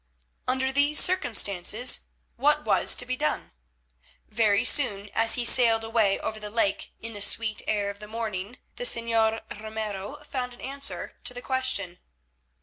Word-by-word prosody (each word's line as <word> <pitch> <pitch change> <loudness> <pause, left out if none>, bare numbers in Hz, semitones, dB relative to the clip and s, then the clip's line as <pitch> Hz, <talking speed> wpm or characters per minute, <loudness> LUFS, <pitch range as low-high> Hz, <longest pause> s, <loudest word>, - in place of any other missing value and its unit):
Under 260 +1 0
these 285 +2 +2
circumstances 220 - +3 0.3
what - - +1
was - - +2
to - - -1
be - - -3
done? - - -3 0.8
Very 210 -2 +1
soon, 210 -8 +2
as 225 0 +3
he 245 - -2
sailed 230 -2 +4
away 225 -3 +1
over 220 0 -4
the 210 -1 -7
lake 205 -2 -1
in 225 0 -7
the 205 - -7
sweet 220 +1 +1
air 205 -1 -1
of 200 - -15
the 210 - -10
morning, 215 0 -5 0.2
the - - -5
Señor 230 -2 +1 0.2
Ramiro 215 +1 -6
found 250 -2 -5
an - - -17
answer 275 +1 -3
to 250 - -4
the 245 - -7
question. 200 -9 -2
225 Hz, 155 wpm, -26 LUFS, 205-245 Hz, 0.8 s, sailed